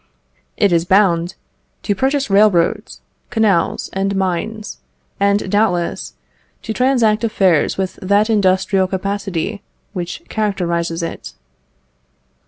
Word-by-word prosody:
It 200 Hz, -, +3 dB
is 170 Hz, -1 st, +3 dB
bound 175 Hz, -2 st, +2 dB, 0.5 s
"To 205 Hz, -, +1 dB
purchase 270 Hz, +6 st, 0 dB
railroads, 195 Hz, -4 st, +2 dB, 0.3 s
canals, 210 Hz, -7 st, +1 dB
and 195 Hz, +1 st, -1 dB
mines; 195 Hz, +3 st, -3 dB, 0.4 s
and, 200 Hz, 0 st, +2 dB
doubtless, 190 Hz, -5 st, 0 dB, 0.5 s
to 220 Hz, -, -3 dB
transact 240 Hz, -4 st, +2 dB
affairs 190 Hz, -8 st, +2 dB
with 190 Hz, -1 st, -3 dB
that 200 Hz, +3 st, +2 dB
industrial 190 Hz, -2 st, +2 dB
capacity 195 Hz, 0 st, -3 dB, 0.3 s
which 175 Hz, -3 st, -5 dB
characterises 170 Hz, -5 st, -2 dB
it." 165 Hz, -, -6 dB
195 Hz, 100 wpm, -18 LUFS, 180-215 Hz, 0.5 s, It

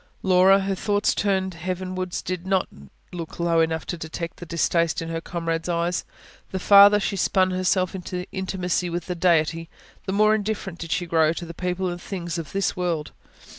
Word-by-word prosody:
Laura, 190 Hz, +1 st, +5 dB
her 195 Hz, 0 st, -1 dB
thoughts 205 Hz, +2 st, +1 dB
turned 190 Hz, -2 st, 0 dB
heavenwards, 185 Hz, +1 st, -4 dB
did 185 Hz, 0 st, -4 dB
not 190 Hz, -1 st, +1 dB, 0.5 s
look 170 Hz, -2 st, -7 dB
low 170 Hz, -1 st, +2 dB
enough 160 Hz, 0 st, 0 dB
to 175 Hz, -, -5 dB
detect 160 Hz, +1 st, -6 dB
the 175 Hz, -, -9 dB
distaste 170 Hz, 0 st, +1 dB
in 165 Hz, -, -5 dB
her 165 Hz, 0 st, -3 dB
comrades' 165 Hz, 0 st, -3 dB
eyes. 170 Hz, +1 st, -1 dB, 0.4 s
The 190 Hz, -, -3 dB
farther 200 Hz, +2 st, +7 dB
she 200 Hz, 0 st, -2 dB
spun 185 Hz, 0 st, +2 dB
herself 185 Hz, 0 st, +1 dB
into 180 Hz, -1 st, -5 dB
her -, -, -7 dB
intimacy 185 Hz, -2 st, -2 dB
with 170 Hz, -1 st, -3 dB
the 180 Hz, -, -3 dB
Deity, 165 Hz, -2 st, +1 dB, 0.4 s
the -, -, -1 dB
more 215 Hz, +2 st, +4 dB
indifferent 205 Hz, -4 st, -3 dB
did 165 Hz, -1 st, -6 dB
she 175 Hz, -, 0 dB
grow 160 Hz, -2 st, +3 dB
to 170 Hz, -, -6 dB
the 170 Hz, -, -8 dB
people 180 Hz, +2 st, -2 dB
and 175 Hz, 0 st, -4 dB
things 175 Hz, -3 st, -4 dB
of 165 Hz, -, -7 dB
this 195 Hz, 0 st, 0 dB
world. 170 Hz, -5 st, -2 dB
180 Hz, 190 wpm, -24 LUFS, 170-190 Hz, 0.5 s, farther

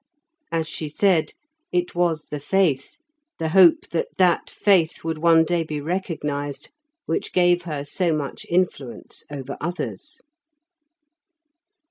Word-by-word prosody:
As 165 Hz, -1 st, -1 dB
she 155 Hz, -1 st, -4 dB
said, 175 Hz, +1 st, +2 dB, 0.4 s
it 180 Hz, 0 st, 0 dB
was 170 Hz, -3 st, 0 dB
the 150 Hz, -, -3 dB
faith, 145 Hz, -3 st, 0 dB, 0.4 s
the 160 Hz, -1 st, -2 dB
hope 175 Hz, -1 st, +6 dB
that 165 Hz, -, -1 dB
that 180 Hz, -2 st, +3 dB
faith 185 Hz, -6 st, +2 dB
would 160 Hz, -1 st, -3 dB
one 165 Hz, 0 st, +5 dB
day 175 Hz, 0 st, 0 dB
be 155 Hz, -2 st, -4 dB
recognised, 150 Hz, -4 st, -3 dB, 0.3 s
which 165 Hz, -, -2 dB
gave 175 Hz, -1 st, +3 dB
her 150 Hz, -4 st, -4 dB
so 170 Hz, +4 st, 0 dB
much 150 Hz, -3 st, -3 dB
influence 170 Hz, -8 st, -2 dB
over 140 Hz, -1 st, -6 dB
others. 175 Hz, -, -5 dB
165 Hz, 125 wpm, -23 LUFS, 150-175 Hz, 0.4 s, hope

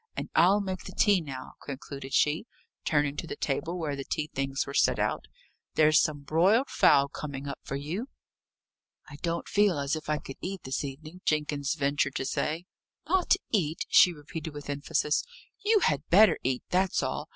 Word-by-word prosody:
"And -, -, -4 dB
I'll 195 Hz, +4 st, +5 dB
make 190 Hz, -2 st, -5 dB
the 190 Hz, -, -9 dB
tea 200 Hz, -4 st, +4 dB
now," 135 Hz, -5 st, -7 dB
concluded 135 Hz, -1 st, -7 dB
she, 150 Hz, -, +2 dB, 0.4 s
turning 145 Hz, -2 st, +1 dB
to 165 Hz, -, -4 dB
the -, -, -5 dB
table 165 Hz, +5 st, -2 dB
where 155 Hz, -4 st, -2 dB
the 140 Hz, -, -5 dB
tea 150 Hz, +2 st, -3 dB
things 135 Hz, 0 st, -1 dB
were 140 Hz, -, -7 dB
set -, -, +3 dB
out. -, -, -1 dB, 0.5 s
"There's 155 Hz, 0 st, +5 dB
some 145 Hz, -2 st, -2 dB
broiled 190 Hz, -, +3 dB
fowl 140 Hz, 0 st, +5 dB
coming 140 Hz, -1 st, -6 dB
up 140 Hz, -, -5 dB
for 135 Hz, -, -5 dB
you." 165 Hz, -, -4 dB, 1.0 s
"I 145 Hz, -, -9 dB
don't 170 Hz, +2 st, -3 dB
feel 200 Hz, -5 st, +3 dB
as 140 Hz, +1 st, -1 dB
if 155 Hz, -1 st, -7 dB
I 150 Hz, -, +2 dB
could 135 Hz, -2 st, -9 dB
eat 190 Hz, 0 st, -5 dB
this 130 Hz, +2 st, -2 dB
evening," 155 Hz, +6 st, -8 dB
Jenkins 150 Hz, -2 st, 0 dB
ventured 140 Hz, -1 st, 0 dB
to 130 Hz, -, -2 dB
say. 160 Hz, +6 st, -2 dB, 0.4 s
"Not 370 Hz, +2 st, +3 dB, 0.2 s
eat!" 165 Hz, -7 st, 0 dB
she 180 Hz, -, +7 dB
repeated 155 Hz, 0 st, -7 dB
with 145 Hz, 0 st, -5 dB
emphasis. 150 Hz, +1 st, 0 dB, 0.4 s
"You 425 Hz, 0 st, +4 dB
had 145 Hz, -, 0 dB
better 210 Hz, +5 st, +6 dB
eat 130 Hz, 0 st, -1 dB
that's 185 Hz, 0 st, +2 dB
all. -, -, -3 dB
150 Hz, 185 wpm, -28 LUFS, 140-180 Hz, 1.0 s, she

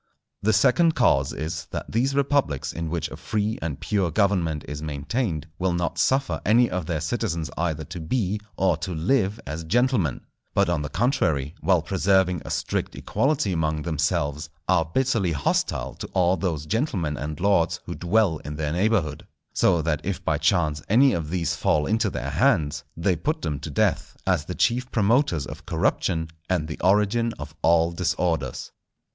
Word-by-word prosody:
The 110 Hz, -, +2 dB
second 130 Hz, -, +4 dB
cause 70 Hz, -, +3 dB
is, 80 Hz, 0 st, -4 dB
that -, -, -5 dB
these 130 Hz, +5 st, +1 dB
republics 140 Hz, -, +1 dB
in 85 Hz, -1 st, -4 dB
which 85 Hz, 0 st, -2 dB
a -, -, -6 dB
free 110 Hz, 0 st, -2 dB
and 80 Hz, -4 st, -3 dB
pure 100 Hz, -4 st, 0 dB
government 85 Hz, -4 st, +1 dB
is 75 Hz, 0 st, -5 dB
maintained 80 Hz, -, -2 dB
will 95 Hz, -1 st, +1 dB
not 85 Hz, 0 st, -2 dB
suffer 135 Hz, -, +1 dB
any 120 Hz, +3 st, +4 dB
of 90 Hz, -3 st, -3 dB
their 80 Hz, -3 st, -1 dB
citizens 85 Hz, -, -2 dB
either 80 Hz, -2 st, -1 dB
to 85 Hz, +3 st, -8 dB
be, 100 Hz, +4 st, -1 dB, 0.2 s
or 95 Hz, -4 st, +2 dB
to 85 Hz, +2 st, -4 dB
live 100 Hz, +4 st, +1 dB
as 75 Hz, +3 st, -5 dB
gentlemen; 110 Hz, -, +1 dB, 0.3 s
but 100 Hz, -2 st, +3 dB
on 85 Hz, -4 st, 0 dB
the 75 Hz, -, -4 dB
contrary, 85 Hz, -, 0 dB
while 90 Hz, -4 st, +3 dB
preserving 95 Hz, -1 st, +2 dB
a -, -, -8 dB
strict -, -, -2 dB
equality 135 Hz, -9 st, 0 dB
among 80 Hz, -2 st, -1 dB
themselves, 75 Hz, -1 st, -1 dB, 0.2 s
are 90 Hz, -3 st, +3 dB
bitterly 115 Hz, -9 st, +1 dB
hostile 70 Hz, -2 st, -1 dB
to -, -, -7 dB
all 90 Hz, -1 st, +3 dB
those 80 Hz, -4 st, -2 dB
gentlemen 95 Hz, -, -1 dB
and 75 Hz, +3 st, -5 dB
lords 90 Hz, -3 st, +2 dB
who -, -, -5 dB
dwell 90 Hz, -2 st, +1 dB
in 75 Hz, -, -7 dB
their 75 Hz, -1 st, -2 dB
neighbourhood; 90 Hz, -6 st, 0 dB, 0.3 s
so 85 Hz, -4 st, +3 dB
that 75 Hz, -2 st, 0 dB
if 100 Hz, 0 st, -4 dB
by 75 Hz, -2 st, +1 dB
chance 80 Hz, -3 st, +1 dB
any 130 Hz, +6 st, +5 dB
of 80 Hz, -3 st, -2 dB
these 85 Hz, -2 st, -1 dB
fall 75 Hz, -1 st, +1 dB
into 110 Hz, -1 st, +1 dB
their 70 Hz, -5 st, -4 dB
hands, 75 Hz, -, +2 dB
they 90 Hz, +2 st, +1 dB
put 155 Hz, -, -2 dB
them 75 Hz, -3 st, -2 dB
to 75 Hz, -, -6 dB
death, 70 Hz, -, 0 dB
as -, -, +1 dB
the -, -, -5 dB
chief 125 Hz, +2 st, +1 dB
promoters 110 Hz, -, +2 dB
of -, -, -10 dB
corruption 80 Hz, 0 st, 0 dB, 0.2 s
and 85 Hz, -4 st, 0 dB
the 80 Hz, -, -6 dB
origin 105 Hz, +4 st, +2 dB
of 75 Hz, 0 st, -8 dB
all 85 Hz, 0 st, +4 dB
disorders. 85 Hz, -6 st, -1 dB
85 Hz, 175 wpm, -24 LUFS, 80-105 Hz, 0.3 s, any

